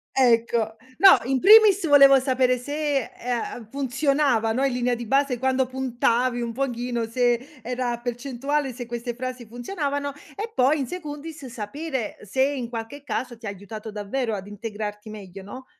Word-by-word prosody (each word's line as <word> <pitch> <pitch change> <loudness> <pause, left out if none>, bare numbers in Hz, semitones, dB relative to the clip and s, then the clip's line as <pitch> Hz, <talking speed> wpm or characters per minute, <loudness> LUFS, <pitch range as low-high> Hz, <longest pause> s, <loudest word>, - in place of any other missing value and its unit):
Ecco. 230 -3 +2 0.2
No 390 -1 +8
in 265 0 +1
primis 410 -2 +7
volevo 275 -2 +8
sapere 255 -1 +2
se, 285 0 -2
ehm, 240 -2 -4
funzionava, 275 -3 +1
no 260 +4 0
in 265 - 0
linea 250 0 0
di 235 0 -6
base 275 +1 +1
quando 260 +1 +1
puntavi 250 -1 0
un 235 -1 -3
pochino, 240 -2 -2
se 245 +4 -1
era 245 0 -2
percentuale 265 +3 -2
se 245 0 -7
queste 240 +1 -4
frasi 255 -1 -5
funzionavano 285 - -3 0.2
e 440 +2 -5
poi 270 +4 +3
"in 265 - -2
secundis" 305 -3 -7
sapere 250 +2 -5
se 260 +6 -2
in 270 -4 -1
qualche 235 +5 -7
caso 250 -4 -4
ti 230 - -12
ha - - -2
aiutato 210 +2 -8
davvero 215 +2 -2
ad 195 0 -7
integrarti 210 0 -6
meglio, 195 -2 -9
no? 255 +6 -9
250 Hz, 160 wpm, -24 LUFS, 230-275 Hz, 0.2 s, No